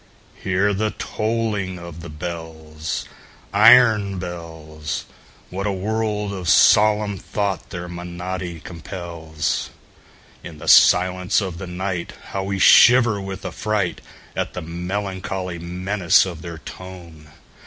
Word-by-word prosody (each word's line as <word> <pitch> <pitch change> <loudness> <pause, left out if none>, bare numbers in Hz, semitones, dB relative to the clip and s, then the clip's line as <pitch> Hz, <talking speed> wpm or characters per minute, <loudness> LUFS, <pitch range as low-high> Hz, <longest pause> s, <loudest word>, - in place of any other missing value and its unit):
Hear 95 +2 +1
the 105 +2 0
tolling 110 -4 -2
of 85 -1 -9
the 85 - -8
bells, 80 -1 -6 0.5
Iron 110 -2 +6
bells! 80 -4 -6 0.5
What 100 +3 -3
a - - +1
world 105 +1 -2
of 90 -3 -3
solemn 105 -2 +4
thought 100 -3 -3
their 90 -2 -6
monody 90 0 -6
compels! 85 -3 -4 0.7
In - - -9
the - - -10
silence 90 0 +5
of 95 -4 -4
the 95 - -6
nightHow 95 +1 -4
we 100 0 -2
shiver 115 +2 +6
with 95 0 -7
affrightAt 105 -4 -2 0.5
the 90 - -5
melancholy 90 +1 -4
menace 90 +2 +2
of 85 -4 -7
their 85 -2 -7
tone! 85 -3 -11
90 Hz, 110 wpm, -21 LUFS, 85-100 Hz, 0.7 s, Iron